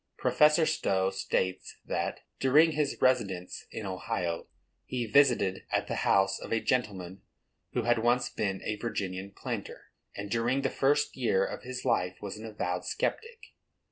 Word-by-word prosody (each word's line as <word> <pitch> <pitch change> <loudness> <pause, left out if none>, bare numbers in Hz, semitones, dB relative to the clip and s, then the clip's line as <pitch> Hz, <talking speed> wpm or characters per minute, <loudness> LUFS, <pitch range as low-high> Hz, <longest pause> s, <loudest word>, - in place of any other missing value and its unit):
Professor 150 +2 +4
Stowe 95 -8 +1
states 95 -1 -2
that, - - -2 0.2
during 150 +5 +5
his 150 -2 -1
residence 100 -9 +1
in 110 - -6
Ohio, 90 -3 -3 0.4
he 125 -2 -2
visited 115 -6 +3
at - - +1
the - - -3
house 95 0 +3
of - - -8
a 115 - +2
gentleman 100 -7 -2 0.5
who 120 - 0
had 120 0 +3
once 120 +2 +2
been 95 -2 -2
a 105 - -2
Virginian 100 -4 -3
planter, 100 - -6 0.2
and 100 0 -6
during 120 +4 +1
the 135 - +1
first 140 +2 +2
years 105 -7 +1
of - - -7
his 125 0 -6
life 90 0 +1
was 100 -2 -6
an 110 +1 -8
avowed 90 -4 -3
sceptic. 460 - -3
110 Hz, 155 wpm, -30 LUFS, 95-130 Hz, 0.5 s, during